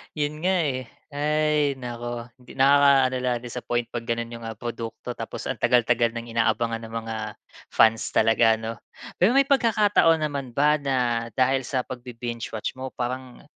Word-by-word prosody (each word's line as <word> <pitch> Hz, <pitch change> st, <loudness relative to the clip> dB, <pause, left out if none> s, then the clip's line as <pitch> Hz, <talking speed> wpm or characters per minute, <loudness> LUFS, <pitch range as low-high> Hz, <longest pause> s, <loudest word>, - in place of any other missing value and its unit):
'Yon 150 Hz, 0 st, -1 dB
nga, 190 Hz, 0 st, +3 dB
eh. 130 Hz, -3 st, -2 dB, 0.2 s
Hay 150 Hz, 0 st, +1 dB
naku! 120 Hz, -1 st, -5 dB
Hindi 125 Hz, -, -15 dB
nakakaano 135 Hz, -1 st, +5 dB
lang, 125 Hz, -1 st, 0 dB
disappoint 120 Hz, -1 st, -3 dB
'pag 115 Hz, -1 st, -5 dB
gano'n 115 Hz, 0 st, -2 dB
'yong, 115 Hz, -1 st, -8 dB
ah, 115 Hz, -, -4 dB
produkto 115 Hz, 0 st, -6 dB
tapos -, -, -6 dB
ang -, -, -2 dB
tagal-tagal 120 Hz, -1 st, +3 dB
ng 115 Hz, 0 st, -6 dB
inaabangan 115 Hz, 0 st, +1 dB
ng 115 Hz, 0 st, -9 dB
mga 115 Hz, 0 st, -4 dB, 0.6 s
fans 110 Hz, 0 st, +4 dB
talaga 115 Hz, 0 st, +4 dB
'no? 110 Hz, 0 st, -5 dB, 0.4 s
Pero 190 Hz, +7 st, +4 dB
may 275 Hz, -, +6 dB
pagkakataon 210 Hz, -, +3 dB
naman 140 Hz, -4 st, -3 dB
ba 150 Hz, +2 st, +4 dB
na 125 Hz, -4 st, 0 dB
dahil 130 Hz, +1 st, +2 dB
sa 130 Hz, -2 st, 0 dB
pag-bi-binge-watch 120 Hz, -3 st, -6 dB
mo 130 Hz, -, -4 dB
parang 125 Hz, 0 st, -5 dB
125 Hz, 155 wpm, -25 LUFS, 115-140 Hz, 0.6 s, may